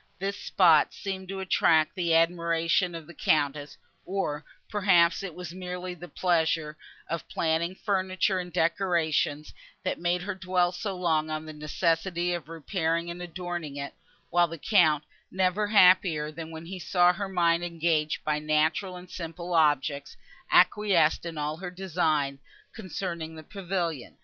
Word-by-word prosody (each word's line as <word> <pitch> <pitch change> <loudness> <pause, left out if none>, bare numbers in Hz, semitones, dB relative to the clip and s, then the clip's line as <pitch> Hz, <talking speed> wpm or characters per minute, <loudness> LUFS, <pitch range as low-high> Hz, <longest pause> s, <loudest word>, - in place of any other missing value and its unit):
This 195 +1 -3
spot 165 -8 +4
seemed 190 -1 -5
to 195 0 -4
attract 160 -4 +3
even 185 - -4
the 165 - +4
admiration 170 +1 +2
of 165 -2 -7
the 170 - -12
Countess, 145 -2 0 0.3
or, 170 -6 -3 0.2
perhaps, 185 -4 +3
it 195 -5 -6
was 180 -2 -7
merely 180 0 -5
the 175 0 -10
pleasure 160 -4 0 0.3
of 170 0 -4
planning 165 +2 0
furniture 190 -1 0
and 180 -1 -6
decorations, 160 -4 0 0.3
that - - -2
made 175 +1 0
her 205 +2 -3
dwell 185 -1 +1
so 195 +1 -4
long 160 -3 +1
on 155 0 -4
the 155 - -8
necessity 170 +3 -1
of 165 -4 -5
repairing 165 0 -2
and 175 +1 -8
adorning 175 -3 -5
it; 140 0 -5 0.4
while 175 0 +4
the 165 0 -7
Count, 155 -5 +3 0.3
never 190 +3 +1
happier 180 -6 +4
than 160 +1 -8
when 160 0 -9
he 185 +2 -7
saw 180 0 +3
her 195 +2 -4
mind 170 -2 +2
engaged 165 -3 0
by 150 0 0
natural 155 +5 0
and 180 0 -11
simple 170 +1 -6
objects, 145 -3 +1 0.3
acquiesced 180 -6 +4
in 165 -2 -6
all 150 +1 -2
her 180 +1 -6
designs, 160 -7 -1 0.3
concerning 175 -5 -5
the 160 - -10
pavilion. 175 -6 -4
170 Hz, 155 wpm, -27 LUFS, 160-185 Hz, 0.4 s, spot